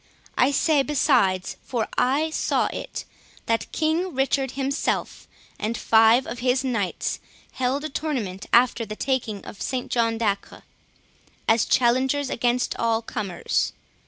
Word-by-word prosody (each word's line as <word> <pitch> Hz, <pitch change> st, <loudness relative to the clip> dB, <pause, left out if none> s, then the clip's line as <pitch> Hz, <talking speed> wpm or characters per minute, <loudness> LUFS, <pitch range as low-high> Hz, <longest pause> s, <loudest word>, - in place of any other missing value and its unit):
I 250 Hz, -, +4 dB
say 290 Hz, +1 st, +3 dB
besides, 250 Hz, -10 st, +2 dB
for 235 Hz, -4 st, -2 dB
I 290 Hz, +5 st, +2 dB
saw -, -, +1 dB
it, -, -, -6 dB, 0.4 s
that 230 Hz, 0 st, -1 dB
King 325 Hz, +2 st, 0 dB
Richard 270 Hz, -1 st, 0 dB
himself, 275 Hz, +1 st, -2 dB, 0.3 s
and 225 Hz, +2 st, -2 dB
five 225 Hz, +3 st, +5 dB
of 240 Hz, -, -6 dB
his 255 Hz, +1 st, +1 dB
knights, 230 Hz, -8 st, -2 dB, 0.3 s
held 260 Hz, +3 st, -1 dB
a 310 Hz, -, -3 dB
tournament 235 Hz, -11 st, -3 dB
after 240 Hz, -1 st, +4 dB
the 215 Hz, -1 st, -6 dB
taking 230 Hz, -5 st, -2 dB
of 200 Hz, -, -10 dB
St 255 Hz, -1 st, -3 dB
John 230 Hz, -1 st, +1 dB
de 230 Hz, -, -1 dB
Acre, 200 Hz, -, -10 dB, 0.8 s
as 225 Hz, 0 st, +4 dB
challengers 260 Hz, +3 st, +2 dB
against 245 Hz, +1 st, 0 dB
all 230 Hz, 0 st, +1 dB
comers. 200 Hz, -6 st, -2 dB
250 Hz, 135 wpm, -24 LUFS, 225-270 Hz, 0.8 s, five